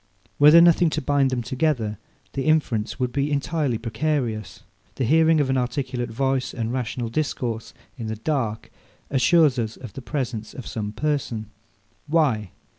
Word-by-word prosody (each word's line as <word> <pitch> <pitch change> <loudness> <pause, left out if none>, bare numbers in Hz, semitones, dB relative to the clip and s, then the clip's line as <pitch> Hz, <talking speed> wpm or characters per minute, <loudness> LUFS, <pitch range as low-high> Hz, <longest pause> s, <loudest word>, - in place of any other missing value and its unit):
Were 145 +1 +8
there 170 +2 +8
nothing 170 0 +5
to - - +3
bind 140 -1 +2
them 125 -2 -2
together, 120 -6 -1 0.3
the 135 - -2
inference 140 -9 +1
would 125 -1 0
be 140 +3 -1
entirely 145 -3 0
precarious. 115 -2 -2 0.3
The - - -2
hearing 160 +4 +4
of 145 - +2
an 130 - +2
articulate 125 0 -2
voice 130 +2 -1
and 115 -1 -2
rational 125 -2 -3
discourse 120 -4 -2 0.3
in 115 - -4
the 110 - -3
dark 115 -3 -2 0.4
assures 140 +1 +4
us 110 -1 -3
of 120 -6 -10
the 135 - -7
presence 120 -3 -4
of 130 - -7
some 105 -2 -4
person: 115 -4 -2 0.6
Why? 140 - +1
130 Hz, 160 wpm, -24 LUFS, 115-145 Hz, 0.6 s, Were